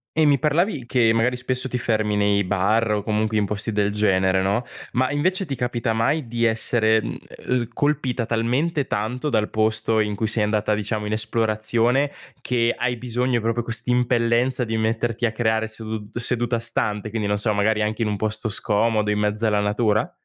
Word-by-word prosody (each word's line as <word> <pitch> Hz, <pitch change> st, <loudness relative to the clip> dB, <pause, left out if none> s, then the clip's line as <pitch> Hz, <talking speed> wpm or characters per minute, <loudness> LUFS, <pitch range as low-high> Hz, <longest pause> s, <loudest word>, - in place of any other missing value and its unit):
E 160 Hz, -1 st, +4 dB
mi 140 Hz, -2 st, +4 dB
parlavi 150 Hz, -, 0 dB
che 120 Hz, -2 st, +2 dB
magari 125 Hz, +2 st, +1 dB
spesso 130 Hz, +1 st, -2 dB
ti 125 Hz, -, -1 dB
fermi 110 Hz, -3 st, 0 dB
nei 100 Hz, -1 st, +2 dB
bar 105 Hz, +4 st, +1 dB
o 105 Hz, -1 st, 0 dB
comunque 110 Hz, 0 st, 0 dB
in 105 Hz, -, +1 dB
posti 105 Hz, +2 st, -2 dB
del 105 Hz, 0 st, +1 dB
genere, 95 Hz, -2 st, +2 dB
no, 100 Hz, +5 st, +1 dB, 0.3 s
ma 130 Hz, +2 st, +1 dB
invece 185 Hz, +6 st, 0 dB
ti 140 Hz, -, -3 dB
capita 120 Hz, -1 st, -1 dB
mai 120 Hz, +4 st, 0 dB
di 120 Hz, 0 st, -1 dB
essere, 110 Hz, 0 st, +2 dB
uhm, 120 Hz, +2 st, -4 dB
colpita 135 Hz, -5 st, -1 dB
talmente 130 Hz, +6 st, 0 dB
tanto 125 Hz, +8 st, -2 dB
dal 110 Hz, -3 st, +1 dB
posto 110 Hz, 0 st, +1 dB
in 105 Hz, -1 st, 0 dB
cui 110 Hz, +2 st, -1 dB
sei 110 Hz, 0 st, +1 dB
andata 105 Hz, 0 st, +1 dB
diciamo 105 Hz, 0 st, -2 dB
in 105 Hz, -, -3 dB
esplorazione 115 Hz, +4 st, +1 dB, 0.3 s
che 120 Hz, -1 st, +1 dB
hai 120 Hz, 0 st, -1 dB
bisogno 125 Hz, 0 st, -1 dB
proprio 115 Hz, +2 st, -1 dB
quest'impellenza 120 Hz, +1 st, +1 dB
di 110 Hz, 0 st, -2 dB
metterti 115 Hz, +1 st, -1 dB
a 110 Hz, -, +1 dB
creare 110 Hz, -1 st, 0 dB
sedu 110 Hz, -1 st, -7 dB
seduta 120 Hz, 0 st, 0 dB
stante, 110 Hz, -2 st, -2 dB
quindi 105 Hz, -1 st, -3 dB
non 105 Hz, 0 st, 0 dB
so, 110 Hz, +1 st, +1 dB
magari 105 Hz, +1 st, +1 dB
anche 110 Hz, +2 st, -1 dB
in 110 Hz, -, +1 dB
un 105 Hz, -, -1 dB
posto 110 Hz, +1 st, -2 dB
scomodo, 105 Hz, +1 st, +1 dB
in 105 Hz, -, 0 dB
mezzo 105 Hz, +2 st, 0 dB
alla 105 Hz, -1 st, +2 dB
natura? 105 Hz, +1 st, 0 dB
115 Hz, 185 wpm, -22 LUFS, 105-125 Hz, 0.3 s, E